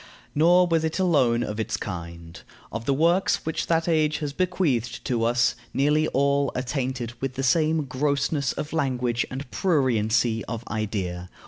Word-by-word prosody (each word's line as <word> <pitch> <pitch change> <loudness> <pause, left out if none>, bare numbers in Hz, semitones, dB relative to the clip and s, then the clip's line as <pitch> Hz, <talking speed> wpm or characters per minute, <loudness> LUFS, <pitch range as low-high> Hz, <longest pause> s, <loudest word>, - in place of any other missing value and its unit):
Nor 175 +4 +5
was 165 -2 +1
it 160 0 -1
alone 135 -11 +2
of 105 -1 -4
its 110 - -1
kind. 85 -3 -7 0.3
Of 110 +1 -5
the 140 - +2
works 170 +6 +2
which 160 - -2
that 165 0 +1
age 155 -2 +2
has 145 -3 -4
bequeathed 155 - -1
to 120 -3 0
us, 120 +1 +2 0.2
nearly 150 +3 +2
all 140 0 +1
are 125 - -1
tainted 130 -3 -3
with 135 -1 -3
the 135 - -3
same 155 +3 +2
grossness 140 0 0
of 150 - -5
language 125 -6 0
and 135 0 -7
pruriency 115 - +1
of 115 0 -5
idea. 95 -5 -3
135 Hz, 160 wpm, -25 LUFS, 115-155 Hz, 0.3 s, Nor